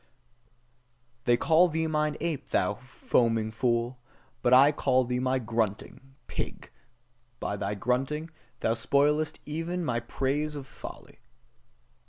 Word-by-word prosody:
They 120 0 +4
call 165 +7 +5
thee 160 0 -1
mine 150 -1 0
ape, 165 -3 -3
thou 90 +3 +2
foaming 115 -1 0
fool: 120 +2 0 0.4
but 120 - +2
I 135 +3 +8
call 130 -3 +2
thee 125 0 -1
my 130 +1 +1
grunting 115 +3 -3
pig, - - -5 0.7
by 100 - -2
thy 100 0 -2
grunting, 135 +8 -1 0.3
thou 110 - +2
spoilest 150 +6 +1
even 165 +4 -3
my 120 -3 0
praise 140 +5 -1
of 140 -2 -6
folly. - - -11
130 Hz, 125 wpm, -28 LUFS, 120-150 Hz, 0.7 s, I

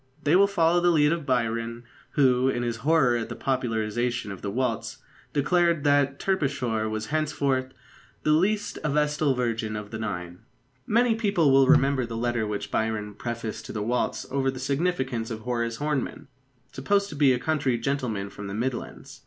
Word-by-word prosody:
They 150 +4 +3
will 200 +2 +6
follow 175 -3 +3
the 175 - +4
lead 150 -3 +4
of 165 -4 -2
Byron, 115 -1 -1 0.3
who, 130 -2 +3
in 120 -2 -1
his 120 -1 -2
horror 135 -1 +3
at 115 -1 -3
the - - -5
popularisation 120 -2 -1
of 95 - -8
the 100 - -3
waltz, 120 +2 -2 0.3
declared 170 +1 +2
that 145 -1 +3
Terpsichore 130 - 0
was 110 +2 -4
henceforth 140 -4 0 0.5
"the 155 - +2
least 200 +7 +1
a 150 - 0
vestal 150 -1 +1
virgin 115 -3 -2
of 105 -1 -6
the 110 - -5
Nine." 90 -5 -5 0.5
Many 235 +1 +3
people 200 -9 +2
will 135 0 +5
remember 135 -2 +4
the 115 -1 -5
letter 120 -2 -1
which 105 -1 -4
Byron 110 -2 -1
prefaced 115 0 -5
to - - -7
The 105 -2 -2
Waltz 125 +3 -1
over 135 0 +1
the 130 - -4
signature 135 -5 -1
of 110 - -11
Horace 115 -1 -2
Hornem, 145 -1 -3 0.4
supposed 200 +9 0
to - - -8
be 140 -2 +4
a 125 - +2
country 140 -4 0
gentleman 115 -6 -2
from 105 - -8
the 100 - -5
Midlands. 120 +3 -4
130 Hz, 180 wpm, -26 LUFS, 115-150 Hz, 0.5 s, will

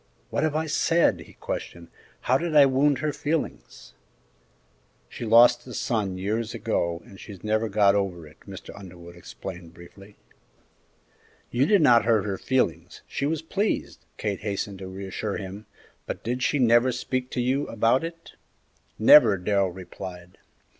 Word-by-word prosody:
"What - - -1
have 155 -1 0
I 160 +1 0
said?" 165 +2 +2
he - - -13
questioned; 85 -1 -7 0.3
"how 130 +2 +2
did 170 -2 -3
I 145 -2 +8
wound 135 +1 +2
her 150 - 0
feelings?" 150 +2 -4 1.1
"She 120 - -7
lost 120 +3 +5
a 125 - -8
son 100 -5 -2
years 110 +5 -3
ago, 85 -7 -2
and 95 - -15
she's 100 -4 -11
never 110 +1 0
got 100 -1 +4
over 95 -5 -2
it," 75 +1 -17
Mr. 95 -1 -10
Underwood 85 -3 -12
explained, 85 -1 -10
briefly. 95 +4 -15 1.4
"You 130 +4 +2
did 200 -4 +4
not 120 -5 +5
hurt 110 -3 +2
her 100 -2 -3
feelings 130 -1 -1
she 140 - -2
was 160 0 -2
pleased," 200 +6 -2
Kate 100 -2 -3
hastened 100 -1 -4
to 95 - -7
reassure 95 +2 -5
him; 100 +2 -8 0.4
"but - - -6
did 125 +2 -3
she 145 - +1
never 120 0 +4
speak 125 +1 -3
to - - -4
you 130 +4 0
about 115 +5 +1
it?" 165 0 -8 0.7
"Never," 110 -2 +7
Darrell 100 +1 +1
replied. 90 0 -10
110 Hz, 155 wpm, -25 LUFS, 95-130 Hz, 1.4 s, I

